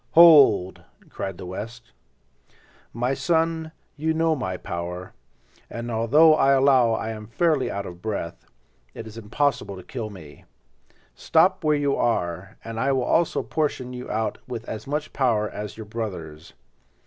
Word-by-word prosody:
"Hold!" 145 - +7 0.3
cried 95 -2 -5
the - - -8
West. 115 - -8 1.0
"My 125 +3 -1
son, 160 +3 0 0.2
you 160 +2 -1
know 165 0 +2
my 95 -10 -3
power, 90 +1 -6 0.6
and 120 +1 -5
although 140 +9 +5
I 140 -3 +4
allow 130 -4 +4
I 110 - -2
am 110 -1 -7
now - - -18
fairly 155 +1 +1
out 100 0 -4
of 90 -1 -9
breath, 100 -5 -5 0.5
it 115 - -7
is 110 -1 -10
impossible 115 -1 -1
to 95 - -10
kill 120 -7 -5
me. 80 -8 -13 0.7
Stop 185 +4 +2
where 150 -1 +3
you 140 -1 +1
are, 90 -5 -1
and 115 0 -6
I 135 +3 +1
will 130 -1 +1
also 165 +6 +1
portion 135 -5 -2
you 125 0 -7
out 110 +1 -2
with 120 -2 -6
as 110 +4 -6
much 150 +2 -3
power 115 -6 +1
as 105 0 -7
your 110 - -7
brothers. 90 -8 -6
115 Hz, 160 wpm, -24 LUFS, 105-145 Hz, 1.0 s, Hold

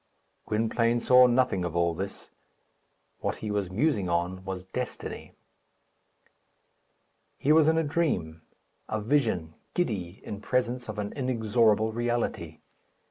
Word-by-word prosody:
Gwynplaine 115 +2 +1
saw 125 +1 +7
nothing 125 -6 +2
of 85 -1 -3
all 85 0 +2
this. 95 +4 -6 0.9
What - - -2
he 105 - -5
was 100 -3 -1
musing 105 - +1
on 90 +2 -1
was 95 -1 -5
destiny. 125 +7 -6 2.0
He 145 - +1
was 155 -1 +6
in 160 0 +4
a 165 - +3
dream 145 - -1 0.5
a 110 - -1
vision 105 - 0 0.2
giddy 100 - -2
in 105 0 -6
presence 125 0 -1
of 110 - -5
an 105 -1 -3
inexorable 110 -4 +2
reality. 120 -9 -2
110 Hz, 125 wpm, -28 LUFS, 95-125 Hz, 2.0 s, saw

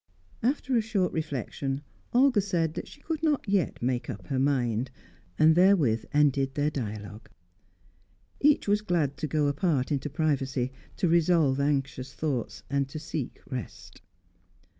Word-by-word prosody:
After 265 +1 0
a 230 - +4
short 205 -5 0
reflection, 140 -2 -3 0.3
Olga 250 -3 +4
said 170 -5 0
that - - -5
she 290 - -14
could 315 0 -3
not 300 -7 +1
yet 195 -10 0
make 125 -1 -1
up 100 -7 -6
her 130 - 0
mind. 125 -3 +1 0.5
And 155 +1 +6
therewith 165 - +4
ended 140 -2 +2
their 145 +1 +1
dialogue. 105 -5 -6 1.1
Each 295 -4 +3
was 205 +1 +3
glad 170 -9 0
to 155 - -2
go 150 +1 +1
apart 145 -2 +1
into 145 0 -1
privacy, 135 -4 0 0.3
to 185 - +1
revolve 165 -5 +3
anxious 135 -2 -1
thoughts, 140 -7 -3
and 140 -1 0
to 145 - -6
seek 155 -3 -5
rest. 130 -4 -7
145 Hz, 145 wpm, -28 LUFS, 130-180 Hz, 1.1 s, And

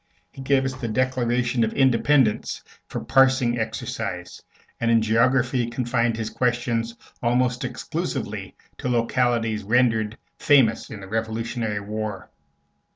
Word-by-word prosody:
He 135 - -10
gave 135 0 +2
us 130 - -2
the 130 -2 -5
Declaration 125 0 0
of 110 - -1
Independence 130 -2 +2 0.2
for - - -5
a - - -13
parsing 130 -3 +3
exercise, 110 - -4 0.4
and 115 - 0
in 115 -1 +5
geography 120 +2 +2
confined 120 -1 0
his 110 -1 -4
questions 120 -1 -1 0.2
almost 125 +1 +1
exclusively - - -4 0.2
to 125 - -2
localities 115 -2 +1
rendered 110 -1 +2 0.2
famous 130 -7 +3
in 105 -3 -8
the 95 - -9
Revolutionary 110 0 -2
War. 105 -1 -5
120 Hz, 125 wpm, -24 LUFS, 110-125 Hz, 0.4 s, in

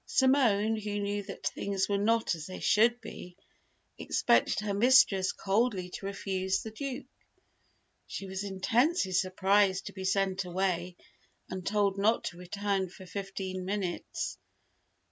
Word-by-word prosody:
Simone, 225 -5 +3
who 205 -1 -3
knew 205 0 -1
that 195 0 -9
things 195 -1 -1
were 200 - 0
not 225 +1 +2
as 165 -2 -6
they 185 - -7
should 235 +3 +3
be, 180 0 -10 0.6
expected - - +2
her 210 -1 -2
mistress 215 -4 +5
coldly 195 -3 0
to 195 - -6
refuse 190 -1 -2
the 220 - -6
Duke. 260 +2 -5 1.0
She 195 - -6
was 190 +1 -4
intensely 225 - +1
surprised 190 +1 +2
to - - -7
be 190 - -7
sent 190 0 +1
away 180 -1 -1 0.6
and 185 -1 -4
told 200 0 +1
not 220 +3 +2
to 175 - -5
return 195 +1 -2
for 190 +1 -12
fifteen 190 0 -5
minutes. 190 -2 -3
195 Hz, 140 wpm, -30 LUFS, 190-210 Hz, 1.0 s, mistress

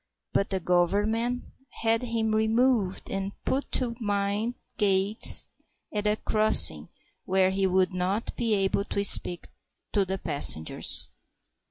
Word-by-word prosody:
but 200 - 0
the 190 - -2
Government 205 +8 -1 0.4
had 225 0 +1
him 230 -3 -2
removed 220 -2 0
and 195 0 -4
put 275 +2 -2
to 240 -3 -1
mind 205 +2 -2 0.2
gates 200 +1 +4 0.5
at 210 0 -2
a 210 - +1
crossing 215 0 +3 0.4
where 190 0 +1
he 190 0 0
would 185 0 +1
not 185 +5 -3
be 230 -3 0
able 195 0 -1
to 200 0 -3
speak 180 -3 +1 0.4
to 205 - +1
the 190 0 -4
passengers. 145 - +2
205 Hz, 130 wpm, -26 LUFS, 190-225 Hz, 0.5 s, gates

